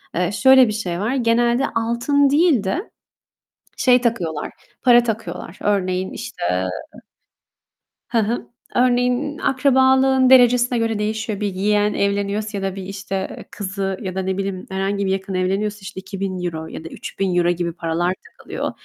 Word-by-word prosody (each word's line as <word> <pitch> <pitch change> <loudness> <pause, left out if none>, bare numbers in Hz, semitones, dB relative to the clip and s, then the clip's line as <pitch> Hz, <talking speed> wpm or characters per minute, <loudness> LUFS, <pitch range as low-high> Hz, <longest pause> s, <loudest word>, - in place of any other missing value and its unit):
Eee, 180 +2 0
şöyle 260 +2 +6
bir 215 - -2
şey 180 -5 -3
var, 230 +6 -1
genelde 240 +1 +2
altın 240 +5 +2
değil 295 - +3
de, 345 - -3 0.9
şey 250 -1 +4
takıyorlar, 180 -11 -2 0.3
para 240 -1 +6
takıyorlar. 225 -5 -5
Örneğin 190 -2 0
işte - - -7 1.6
Ha 230 -1 +1
hı, 235 - -3 0.3
örneğin, 250 +4 +1
akrabalığın 265 -1 +3
derecesine 245 -1 +5
göre 225 -2 0
değişiyor. 215 0 -2
Bir 205 -2 -2
yeğen 205 +2 +1
evleniyorsa 200 +1 -1
ya 195 - -4
da 195 0 -2
bir, 195 - -6
işte, 195 0 -5
kızı 195 -1 -3
ya 185 -1 -5
da, 190 - -1
ne 190 0 -2
bileyim, 195 -2 -3
herhangi 195 +1 -1
bir 190 - 0
yakın 190 0 -3
evleniyorsa 195 +3 -1
işte 190 - -8
€2.000 185 -4 -4
ya - - -8
da 165 - -8
€3.000 180 -3 -1
gibi 170 -1 -1
paralar 170 +1 -1 0.2
takılıyor, - - -5
205 Hz, 145 wpm, -20 LUFS, 190-245 Hz, 1.6 s, şöyle